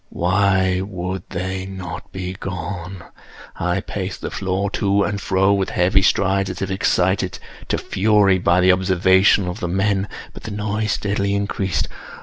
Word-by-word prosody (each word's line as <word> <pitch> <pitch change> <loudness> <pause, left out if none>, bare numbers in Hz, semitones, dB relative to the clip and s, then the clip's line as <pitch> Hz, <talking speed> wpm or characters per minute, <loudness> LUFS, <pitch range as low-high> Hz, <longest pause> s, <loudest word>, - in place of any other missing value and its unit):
Why 95 0 +2
would 95 -1 -4
they 95 +1 -3
not 95 -1 -7
be 90 -1 -4
gone? 90 0 -6 0.5
I - - -1
paced - - -5
the - - -4
floor 95 +1 -1
to 100 -1 +2
and 100 0 -2
fro 95 +1 +2
with 95 -1 0
heavy 95 +2 +3
strides, 95 0 +2
as 95 - -5
if 95 - -3
excited 95 -1 +1 0.3
to - - 0
fury 100 -2 +3
by 90 0 +3
the 95 +1 +6
observations 95 +1 +4
of 90 +5 -5
the 90 - -2
men—but 95 +2 -2
the - - -7
noise 105 0 -1
steadily 100 -1 -1
increased. 100 -3 -1
95 Hz, 150 wpm, -21 LUFS, 90-100 Hz, 0.5 s, the